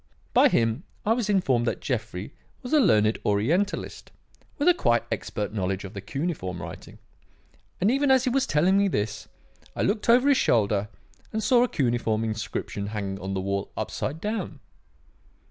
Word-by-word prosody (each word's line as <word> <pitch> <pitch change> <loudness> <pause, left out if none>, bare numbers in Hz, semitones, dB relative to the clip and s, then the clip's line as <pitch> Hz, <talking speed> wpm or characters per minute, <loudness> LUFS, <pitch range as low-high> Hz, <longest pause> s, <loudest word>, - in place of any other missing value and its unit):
By - - +6
him 115 +4 +1 0.2
I 220 - +4
was 230 -3 -2
informed 135 - +2
that - - -1
Jeffrey 110 -3 -4 0.3
was 250 - -5
a 305 - +6
learned 110 - +3
Orientalist, 150 - -1 0.5
with 290 - 0
a 355 - +8
quite 120 - +2
expert 105 0 -3
knowledge 95 -2 -2
of 95 - -8
the 100 - -6
cuneiform 105 - -4
writing; - - -9 0.8
and 200 +5 +3
even 275 +2 +2
as 260 -1 +5
he 255 - +1
was 270 +1 +1
telling 180 +6 +3
me 200 - +3
this, 110 - -2 0.5
I - - -1
looked 210 +2 0
over 250 +4 +6
his 280 -2 +5
shoulder 105 -2 +2 0.4
and 220 0 -2
saw 240 +2 +4
a - - +2
cuneiform 120 -4 0
inscription 110 -2 -4
hanging 100 -2 -4
on 95 +1 -4
the 95 - -1
wall 100 +1 -3
upside 150 +4 -3
down. 205 -7 -4
120 Hz, 170 wpm, -26 LUFS, -, 0.8 s, a